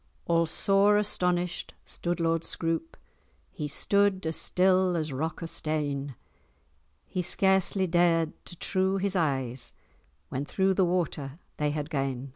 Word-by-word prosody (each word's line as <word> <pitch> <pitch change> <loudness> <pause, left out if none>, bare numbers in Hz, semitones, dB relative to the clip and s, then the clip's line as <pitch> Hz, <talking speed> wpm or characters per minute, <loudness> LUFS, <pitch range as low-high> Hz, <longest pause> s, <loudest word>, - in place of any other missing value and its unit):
All 170 -1 +2
sore 200 +5 +4
astonished 180 -4 -1
stood 175 0 -3
Lord 165 0 +1
Scroope, 165 - -2 0.5
He 150 - -4
stood 200 +4 +1
as 160 0 -1
still 185 0 +2
as 155 -3 -2
rock 160 +5 -3
of 165 - -4
stane; 145 -3 -2 0.9
He 185 - -3
scarcely 190 +1 +2
dared 170 -2 +2
to - - -7
trew[#] 190 +2 0
his 195 0 -1
eyes, 135 -7 -1 0.6
When 130 - -2
through 190 +6 +1
the 190 -1 +3
water 160 -5 -2 0.2
they 150 0 +1
had 150 +1 -3
gane. 135 -2 -2
170 Hz, 135 wpm, -28 LUFS, 150-185 Hz, 0.9 s, sore